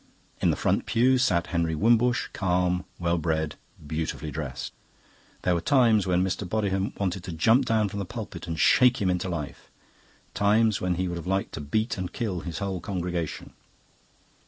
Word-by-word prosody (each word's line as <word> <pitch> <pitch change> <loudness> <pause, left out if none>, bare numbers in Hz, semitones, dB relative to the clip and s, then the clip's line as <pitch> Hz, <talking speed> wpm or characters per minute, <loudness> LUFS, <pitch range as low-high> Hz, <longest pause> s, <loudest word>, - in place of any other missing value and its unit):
In - - +3
the - - +2
front - - 0
pew 130 +3 +3
sat 90 -9 +2
Henry 85 -1 +1
Wimbush, 120 +6 +3
calm, 90 -1 0
well 85 -1 0
bred, 80 -1 -1 0.3
beautifully 80 0 -3
dressed. 70 -5 -5 0.7
There 90 - +2
were 85 - 0
times 115 -3 +4
when 90 0 +2
Mr. 95 +2 -2
Bodiham 95 0 -1
wanted 95 -2 -1
to 90 - -5
jump 115 +11 +3
down 110 -3 +2
from 100 +1 -5
the 100 - -3
pulpit - - -7
and 80 -2 -4
shake 125 +6 +5
him 95 -3 +1
into 90 +1 -2
life, 75 -5 -6 0.6
times 105 +1 +3
when 90 -1 0
he 90 +1 -1
would 85 -1 -3
have 85 - -7
liked 95 +1 0
to - - -6
beat 110 - -1
and 90 -1 -4
kill 105 -7 -2
his 85 -1 -6
whole 95 -3 -3
congregation. 85 -3 -4
90 Hz, 180 wpm, -26 LUFS, 85-105 Hz, 0.7 s, shake